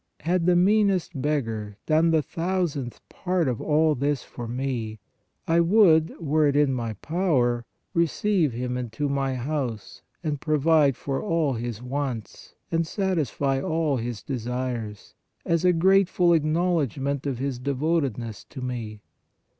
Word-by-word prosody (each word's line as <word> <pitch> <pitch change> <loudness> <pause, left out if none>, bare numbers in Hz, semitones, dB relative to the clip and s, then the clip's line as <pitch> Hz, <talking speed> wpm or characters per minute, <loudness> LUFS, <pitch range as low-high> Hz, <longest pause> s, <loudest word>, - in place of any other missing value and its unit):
Had 170 +2 +1
the 180 - +5
meanest 190 -5 +2
beggai 115 -8 -2
done 160 +1 +3
the 160 -2 +3
thousandth 165 -6 -3
part 180 -4 -1
of 125 -3 -2
all 155 0 +3
this 140 0 -1
for 120 - -8
me, 120 -3 -3 0.5
I 165 +1 +3
would, 170 -3 +4
were 155 -1 +2
it 140 - +1
in 145 -2 +3
my 115 -3 -2
power, 135 -9 +1 0.3
receive 170 0 +1
him 125 +1 -3
into 125 +4 -3
my 135 -1 -1
house 125 -4 -4 0.2
and 150 -4 -2
provide 150 -3 +3
for 135 -1 -3
all 165 -8 +1
his 120 -1 -5
wants 130 -3 -5 0.2
and 165 0 +1
satisfy 150 - 0
all 160 -2 0
his 120 -1 -4
desires, 120 -4 -4 0.3
as 170 0 +1
a 180 - +5
grateful 180 0 +4
acknowledgment 155 - 0
of 135 -3 -2
his 130 -1 -3
devotedness 135 -5 -1
to 140 - -10
me. 115 -4 -5
145 Hz, 140 wpm, -25 LUFS, 125-165 Hz, 0.5 s, the